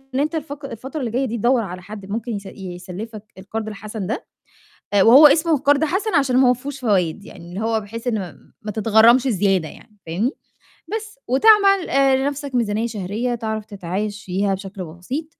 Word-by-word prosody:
إن -, -, +1 dB
أنت 305 Hz, +2 st, -1 dB
الفق 290 Hz, -2 st, -5 dB
الفترة 265 Hz, +5 st, -6 dB
اللي 240 Hz, -3 st, -3 dB
جاية 255 Hz, +4 st, 0 dB
دي 235 Hz, -1 st, -3 dB
تدوَّر 240 Hz, +3 st, +2 dB
على 185 Hz, -2 st, -7 dB
حد 205 Hz, 0 st, -9 dB
ممكن 230 Hz, +3 st, -3 dB
يس 200 Hz, -1 st, -5 dB
يسلِّفَك 190 Hz, +4 st, -8 dB, 0.2 s
القَرْض 215 Hz, +3 st, -5 dB
الحَسَن 210 Hz, -1 st, -6 dB
ده، 225 Hz, +6 st, -3 dB, 0.7 s
آآ 200 Hz, -2 st, +5 dB
وهو 275 Hz, +6 st, +9 dB
اسمه 320 Hz, +1 st, +3 dB
قَرْض 285 Hz, +2 st, +3 dB
حَسَن 390 Hz, +7 st, -1 dB
عشان 265 Hz, -3 st, +3 dB
ما 260 Hz, -1 st, +5 dB
هوَ -, -, +5 dB
فيهوش 275 Hz, +2 st, -7 dB
فوايد، 200 Hz, -6 st, 0 dB
يعني 170 Hz, -1 st, -12 dB
اللي 185 Hz, +4 st, -6 dB
هو 225 Hz, 0 st, +1 dB
بحيث 225 Hz, +4 st, -8 dB
إن 195 Hz, -, -2 dB
م -, -, -24 dB
ما 210 Hz, -, -4 dB
تتغرّمش 225 Hz, +3 st, +5 dB
زيادة 195 Hz, -6 st, +1 dB
يعني، 210 Hz, -, -17 dB
فاهمني، 200 Hz, -, 0 dB, 0.7 s
بس. 430 Hz, -8 st, -8 dB
وتعمل 395 Hz, -, +5 dB
آآ 270 Hz, -1 st, +4 dB
لنَفْسك 280 Hz, 0 st, -3 dB
ميزانية 220 Hz, -1 st, 0 dB
شهرية 220 Hz, +3 st, -3 dB
تعرف 220 Hz, -2 st, -4 dB
تتعايش 205 Hz, +1 st, -4 dB
فيها 195 Hz, +2 st, 0 dB
بشكل 195 Hz, -1 st, -7 dB
بسيط، 180 Hz, -, -5 dB
225 Hz, 185 wpm, -21 LUFS, 200-270 Hz, 0.7 s, وهو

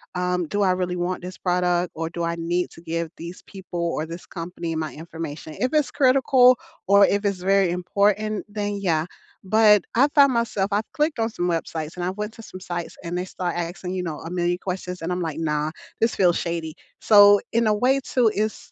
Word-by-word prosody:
um, 180 Hz, -2 st, -1 dB
"Do 205 Hz, +4 st, -1 dB
I 190 Hz, -2 st, +4 dB
really 180 Hz, -1 st, -1 dB
want 180 Hz, 0 st, -3 dB
this 185 Hz, +1 st, -7 dB
product, 180 Hz, -1 st, +1 dB
or 165 Hz, 0 st, -3 dB
do 170 Hz, 0 st, -4 dB
I 170 Hz, 0 st, -1 dB
need 175 Hz, +2 st, -1 dB
to 165 Hz, -, -14 dB
give 165 Hz, -1 st, -3 dB
these 170 Hz, +2 st, -8 dB
people, 185 Hz, -3 st, -7 dB
or 165 Hz, -2 st, -1 dB
this 170 Hz, +2 st, -9 dB
company, 170 Hz, -1 st, -5 dB
my 155 Hz, -1 st, -3 dB
information?" 160 Hz, -1 st, -7 dB
If 255 Hz, +4 st, 0 dB
it's 300 Hz, -2 st, +2 dB
critical, 255 Hz, -1 st, +5 dB, 0.3 s
or 200 Hz, 0 st, +6 dB
if 200 Hz, +1 st, 0 dB
it's 200 Hz, -2 st, 0 dB
very 195 Hz, -1 st, +3 dB
important, 200 Hz, +4 st, 0 dB
then, 205 Hz, -1 st, -3 dB
yeah, 165 Hz, -4 st, +1 dB, 0.4 s
but 210 Hz, 0 st, +5 dB
I 275 Hz, +4 st, +5 dB
found 280 Hz, -3 st, +6 dB
myself 215 Hz, -4 st, 0 dB
I've 210 Hz, +2 st, -1 dB
clicked 300 Hz, -1 st, 0 dB
on 225 Hz, +1 st, +1 dB
some 180 Hz, -5 st, -2 dB
websites, 165 Hz, -1 st, -3 dB
and 175 Hz, -, -4 dB
I -, -, 0 dB
went 210 Hz, +3 st, -5 dB
to 225 Hz, -, -11 dB
some 185 Hz, -, -10 dB
sites, 175 Hz, -2 st, -5 dB
and 170 Hz, +1 st, -3 dB
they 180 Hz, -, -2 dB
start 180 Hz, -2 st, -4 dB
asking, 175 Hz, +2 st, -4 dB
you 180 Hz, -, -1 dB
know, 155 Hz, -3 st, -4 dB
a 165 Hz, -, -8 dB
million 175 Hz, 0 st, 0 dB
questions, 180 Hz, -1 st, -5 dB
and 170 Hz, +2 st, -3 dB
I'm 180 Hz, 0 st, -1 dB
like, 160 Hz, -2 st, -3 dB
"Nah, 150 Hz, -1 st, -1 dB, 0.3 s
this 225 Hz, +1 st, +1 dB
feels 175 Hz, -3 st, +3 dB
shady." 165 Hz, -2 st, -3 dB, 0.3 s
So 205 Hz, -1 st, +7 dB
in 230 Hz, -1 st, +2 dB
a 210 Hz, -, +4 dB
way 255 Hz, +6 st, +2 dB
too, 235 Hz, -4 st, +2 dB
it's 215 Hz, +1 st, -3 dB
180 Hz, 215 wpm, -23 LUFS, 170-210 Hz, 0.4 s, So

